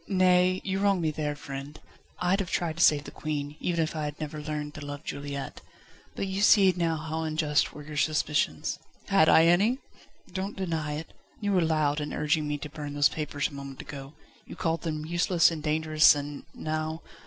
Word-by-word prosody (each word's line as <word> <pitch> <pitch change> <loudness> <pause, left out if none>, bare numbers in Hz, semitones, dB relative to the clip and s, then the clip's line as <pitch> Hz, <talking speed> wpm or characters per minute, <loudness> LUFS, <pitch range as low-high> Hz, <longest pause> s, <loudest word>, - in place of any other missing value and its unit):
"Nay! 185 -1 +3
you 190 0 -1
wrong 200 -2 +3
me 160 -2 0
there, 150 -1 -2
friend. 140 0 -8 0.4
I'd 180 +3 +1
have 190 -4 -2
tried 165 -2 -1
to 175 - +3
save 145 -1 +5
the - - -9
Queen, 150 -1 -4
even 170 -2 0
if 160 - -4
I 155 -1 -2
had 150 0 -5
never 155 0 -5
learned 150 -1 -4
to 150 - -8
love 145 +1 -7
Juliette. 140 -2 -5 0.5
But - - -2
you 190 +1 -2
see 200 -3 +6
now 165 -2 0
how 160 +1 -4
unjust 155 -2 +1
were 150 - -10
your 150 0 -8
suspicions." 150 0 0 0.3
"Had 195 -5 +5
I 160 - +7
any?" 200 +9 +4 0.6
"Don't 195 +2 -4
deny 160 -5 -2
it. 155 +2 -6 0.3
You 205 -1 -1
were 185 - +4
loud 155 -2 +1
in 150 - -4
urging 150 0 0
me 150 0 -1
to 145 - -6
burn 145 -1 -6
those 145 0 +5
papers 150 -2 -2
a - - -16
moment 140 -1 -8
ago. 140 0 -8 0.3
You - - -8
called 165 -1 -1
them 155 -2 -3
useless 175 +1 +3
and 160 -2 -5
dangerous 155 0 +4
and 145 0 -6
now 155 +1 -3
155 Hz, 200 wpm, -28 LUFS, 150-175 Hz, 0.6 s, I